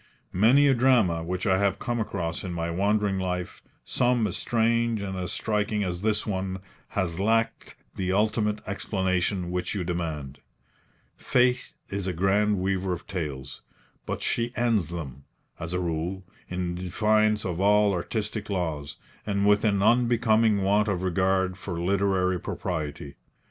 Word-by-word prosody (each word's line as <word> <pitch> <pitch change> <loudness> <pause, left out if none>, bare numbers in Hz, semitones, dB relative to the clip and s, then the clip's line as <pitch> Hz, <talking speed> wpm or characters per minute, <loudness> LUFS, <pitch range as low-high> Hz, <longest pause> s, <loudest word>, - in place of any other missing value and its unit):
Many 125 +9 +5
a 135 - +5
drama 115 -10 +3
which 90 +2 -3
I 95 -1 +3
have 100 -1 +1
come 120 -1 -2
across 85 -6 -3
in 90 -2 -4
my 85 0 -2
wandering 100 +2 +1
life, 90 -1 -3 0.2
some 120 -2 +2
as 100 - -2
strange 115 -1 +1
and 95 -1 -4
as 90 -1 -3
striking 105 0 0
as 90 -2 -3
this 105 0 0
one, 95 -2 -2 0.4
has 90 -3 -1
lacked 115 +3 0 0.2
the 95 -1 -1
ultimate 105 +1 +1
explanation 95 -2 -1
which 90 +3 -2
you 95 - -1
demand. 80 -6 -4 0.8
Fate 125 0 +1
is 100 -1 -3
a 90 - -1
grand 100 +4 +2
weaver 95 0 0
of 85 - -7
tales; 70 -7 -5 0.5
but - - -3
she 120 0 0
ends 115 -8 +1
them, 70 -6 -7 0.4
as 80 +1 -5
a 90 - -1
rule, 85 +2 -2 0.3
in 90 -1 -2
defiance 105 +4 +1
of 90 -2 -2
all 105 0 +4
artistic 105 +4 -3
laws, 80 -7 -3 0.3
and 100 -1 +1
with 105 0 +4
an 100 -3 +2
unbecoming 115 -3 +3
want 105 +2 +3
of 95 -3 -1
regard 95 0 +1
for 90 -3 -5
literary 95 0 +1
propriety. 75 -6 -4
95 Hz, 150 wpm, -26 LUFS, 90-105 Hz, 0.8 s, Many